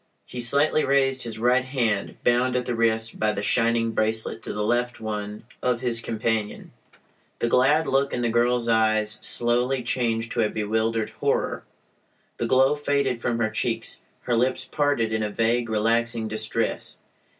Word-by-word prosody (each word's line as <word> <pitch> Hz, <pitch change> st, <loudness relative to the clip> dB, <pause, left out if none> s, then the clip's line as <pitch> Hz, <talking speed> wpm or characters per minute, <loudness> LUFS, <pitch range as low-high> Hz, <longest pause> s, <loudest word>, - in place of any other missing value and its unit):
He 125 Hz, -, -6 dB
slightly 140 Hz, +5 st, +3 dB
raised 135 Hz, -1 st, +2 dB
his 115 Hz, -2 st, -3 dB
right 125 Hz, +3 st, +3 dB
hand, 120 Hz, -6 st, -1 dB
bound 125 Hz, +1 st, +2 dB
at 125 Hz, -1 st, 0 dB
the 125 Hz, -, -2 dB
wrist 115 Hz, -1 st, 0 dB
by 105 Hz, -1 st, +1 dB
the 100 Hz, -, -4 dB
shining 115 Hz, +1 st, +2 dB
"bracelet" 110 Hz, 0 st, -1 dB
to -, -, -5 dB
the 105 Hz, -, -2 dB
left 120 Hz, +2 st, 0 dB
one 105 Hz, -1 st, -5 dB, 0.2 s
of 125 Hz, -1 st, 0 dB
his 120 Hz, -2 st, -1 dB
companion. 110 Hz, -2 st, -2 dB, 0.7 s
The -, -, 0 dB
glad 135 Hz, +7 st, +3 dB
look 135 Hz, 0 st, +1 dB
in 120 Hz, -, -2 dB
the 120 Hz, -, +1 dB
girl's 120 Hz, 0 st, +2 dB
eyes 110 Hz, -1 st, +2 dB
slowly 125 Hz, +2 st, 0 dB
changed 115 Hz, -1 st, -1 dB
to 120 Hz, -, 0 dB
a 105 Hz, -, +2 dB
bewildered 110 Hz, +1 st, -1 dB
horror. -, -, -1 dB, 0.7 s
The 120 Hz, -, -1 dB
glow 130 Hz, +3 st, +4 dB
faded 140 Hz, -4 st, -1 dB
from 120 Hz, -1 st, -1 dB
her 110 Hz, -2 st, 0 dB
cheeks. 110 Hz, -, -2 dB, 0.2 s
Her 120 Hz, -, -1 dB
lips 125 Hz, +3 st, 0 dB
parted 140 Hz, -7 st, 0 dB
in 110 Hz, -, 0 dB
a 105 Hz, -, -1 dB
vague, 115 Hz, +2 st, 0 dB
relaxing 115 Hz, +1 st, +1 dB
distress. 110 Hz, +1 st, -2 dB
115 Hz, 165 wpm, -24 LUFS, 110-125 Hz, 0.7 s, glow